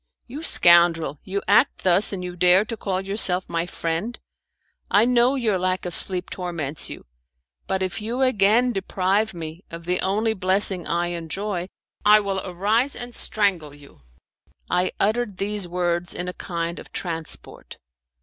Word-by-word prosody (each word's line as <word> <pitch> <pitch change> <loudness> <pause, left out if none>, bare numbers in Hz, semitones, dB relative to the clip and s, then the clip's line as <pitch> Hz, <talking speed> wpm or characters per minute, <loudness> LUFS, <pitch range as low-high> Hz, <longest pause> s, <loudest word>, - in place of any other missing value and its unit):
"You 275 +5 -8
scoundrel! 170 - +4
You 200 +1 -3
act 210 +8 +3
thus 190 +2 +3
and 190 -3 -5
you 180 0 -6
dare 180 +3 +4
to 230 - -5
call 190 -3 -2
yourself 190 -2 +3
my 170 +1 -2
friend! 170 +8 -3 0.7
I 210 +3 +5
know 250 +2 +3
your 220 -8 0
lack 185 0 -1
of 175 - -4
sleep 180 0 -2
torments 170 -6 -4
you, - - -9 0.6
but 190 0 -1
if 185 +3 -3
you 240 +5 -1
again 240 0 +3
deprive 195 +1 0
me 165 +2 -7
of 165 0 -9
the 180 +1 0
only 215 +4 +1
blessing 190 -1 +2
I 175 0 0
enjoy 175 +2 -4 0.3
I 210 +1 +7
will 200 -2 -2
arise 210 +9 0
and 245 0 -8
strangle 185 -11 0
you." 145 - -18 0.7
I 180 +1 +1
uttered 215 -1 0
these 200 -1 -2
words 175 0 -1
in 180 - -4
a 180 - -3
kind 170 -1 -4
of - - -13
transport. 165 -3 -6
185 Hz, 160 wpm, -23 LUFS, 175-210 Hz, 0.7 s, I